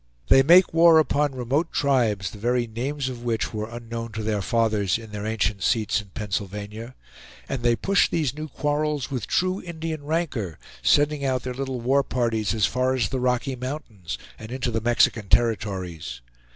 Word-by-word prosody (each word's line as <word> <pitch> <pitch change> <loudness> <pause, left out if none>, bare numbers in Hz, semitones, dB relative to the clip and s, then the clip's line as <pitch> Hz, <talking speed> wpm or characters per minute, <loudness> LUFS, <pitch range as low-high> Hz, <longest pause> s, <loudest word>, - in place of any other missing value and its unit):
They 135 - +8
make 175 +6 +6
war 165 0 +7
upon 145 -2 +2
remote 135 +7 -1
tribes 115 -9 +1
the 105 - -11
very 120 +2 +1
names 130 +5 -3
of 125 -2 -5
which 115 -2 -1
were 110 0 -3
unknown 115 0 -6
to 110 0 -4
their 105 -2 0
fathers 105 -2 +1
in 110 -2 -11
their 105 0 -4
ancient 105 -2 -1
seats 110 0 +1
in 105 - -16
Pennsylvania; 105 +4 -5 0.5
and 135 -3 -3
they 120 -1 +3
push 195 - +2
these 150 -6 0
new 155 +1 -6
quarrels 150 -1 -1
with 125 -6 -3
true 185 +1 0
Indian 160 -3 -5
rancor, 145 - -2 0.2
sending 145 0 +3
out 130 -2 0
their 125 - -4
little 130 -1 -4
war 135 +4 +3
parties 115 -6 -1
as 105 -4 +3
far 130 +1 +1
as 125 - 0
the 130 - -2
Rocky 125 +1 0
Mountains, 120 - -6 0.2
and 110 +1 -9
into 130 -1 -2
the 115 0 -1
Mexican 115 -3 +2
territories. 95 - 0
120 Hz, 180 wpm, -24 LUFS, 110-140 Hz, 0.5 s, They